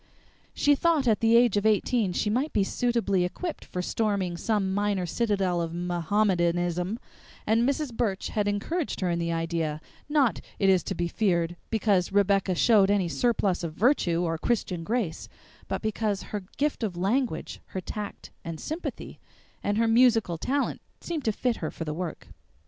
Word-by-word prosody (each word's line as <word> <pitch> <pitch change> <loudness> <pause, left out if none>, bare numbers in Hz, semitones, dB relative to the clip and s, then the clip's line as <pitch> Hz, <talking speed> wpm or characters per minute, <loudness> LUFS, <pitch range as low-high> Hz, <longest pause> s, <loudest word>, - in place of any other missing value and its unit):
She 290 - +4
thought 305 -2 +2
at 220 -2 +3
the 230 0 +5
age 235 -4 +4
of 205 - 0
eighteen 215 -1 +2
she 180 - -1
might 265 +7 0
be 200 - +3
suitably 230 -4 +1
equipped 320 - -4
for 180 - -4
storming 200 -4 -1
some 195 +1 0
minor 200 -2 0
citadel 190 -2 0
of 165 0 -3
Mohammedanism; 175 +1 0 0.5
and 230 +4 +3
Mrs. 280 -2 -2
Burch 215 -4 -1
had 210 -1 0
encouraged 245 - -2
her 180 -2 +1
in 170 - 0
the 170 0 -1
idea, 165 -2 -1 0.3
not, 290 -6 +2 0.2
it 195 - +3
is 185 -2 +5
to 195 - -3
be 175 0 -1
feared, 175 -4 0
because 205 -5 +1
Rebecca 195 -1 +2
showed 200 0 +5
any 200 -4 +2
surplus 190 - +1
of 165 -2 -3
virtue 180 - +2
or 165 -2 -1
Christian 185 -7 -1
grace, 210 -5 -2 0.4
but - - -3
because 215 -2 -1
her 205 -3 -3
gift 295 -1 0
of 200 -6 -2
language, 215 +1 -1
her 190 - -5
tact 205 +3 -7
and 165 -1 -6
sympathy, 315 +3 -6 0.4
and 205 +1 0
her 230 0 +3
musical 225 -7 +4
talent 280 +7 -1 0.2
seemed 325 -4 -4
to 220 - +3
fit 240 +2 -1
her 155 - -3
for 165 - -6
the 150 - -3
work. 170 0 -5
200 Hz, 170 wpm, -27 LUFS, 175-230 Hz, 0.5 s, the